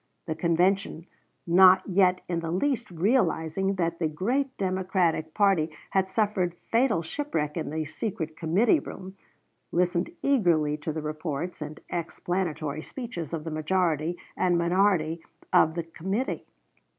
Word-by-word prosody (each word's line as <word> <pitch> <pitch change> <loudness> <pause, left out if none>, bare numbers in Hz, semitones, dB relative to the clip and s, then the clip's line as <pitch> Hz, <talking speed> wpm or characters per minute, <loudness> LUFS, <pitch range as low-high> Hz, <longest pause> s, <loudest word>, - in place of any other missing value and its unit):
The 160 - -2
convention, 170 +2 +1 0.4
not 185 +2 +6
yet 185 -1 +3
in 170 -2 -1
the 165 -1 -4
least 235 - 0
realizing 185 -1 +1
that 170 -2 -1
the 165 - +1
great 245 - -1
Democratic 185 -4 0
party 195 -6 +3 0.2
had 190 -1 +1
suffered 195 -5 0 0.2
fatal 230 -7 +3
shipwreck 160 - -3
in 160 - -3
the 155 +1 -2
secret 160 -1 -4
committee 190 - +3
room, 190 -7 -9 0.6
listened 175 0 +1
eagerly 170 - +3
to 155 +1 -4
the 155 0 -4
reports 155 +2 -4
and 150 +1 -6
explanatory 165 -3 -2
speeches 180 - -6
of 165 -2 -3
the 165 - -5
majority 160 0 0 0.2
and 180 -2 +2
minority 170 -2 +2 0.3
of 160 - +5
the 170 - -2
committee. 190 +9 -3
175 Hz, 135 wpm, -27 LUFS, 160-190 Hz, 0.6 s, not